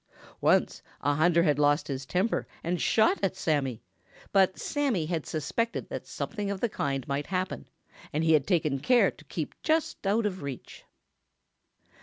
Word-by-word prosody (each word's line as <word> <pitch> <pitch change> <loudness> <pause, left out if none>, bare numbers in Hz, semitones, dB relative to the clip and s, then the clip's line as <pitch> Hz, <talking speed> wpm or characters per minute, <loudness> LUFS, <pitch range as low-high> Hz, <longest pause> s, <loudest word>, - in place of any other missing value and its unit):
Once - - +3 0.2
a 145 - +2
hunter 170 +3 +4
had 150 -3 +2
lost 145 +1 +3
his 135 -1 -4
temper 190 +6 0 0.2
and 175 +1 -1
shot 220 -2 +3
at 195 -1 0
Sammy, 140 -10 -1 0.5
but 190 -1 +4
Sammy 270 - 0
had 165 -2 -3
suspected 180 - -2
that - - -6
something 210 -2 -4
of 200 -1 -3
the 240 - 0
kind 135 -8 -2
might 140 +1 -2
happen, 185 0 -3 0.4
and 155 +2 0
he 160 0 +4
had 145 -3 +3
taken 155 -7 +1
care 245 - +4
to - - -18
keep - - -4
just 315 -10 0
out 215 +3 +2
of 190 -4 -2
reach. 140 -3 -8
170 Hz, 165 wpm, -28 LUFS, 145-200 Hz, 0.5 s, hunter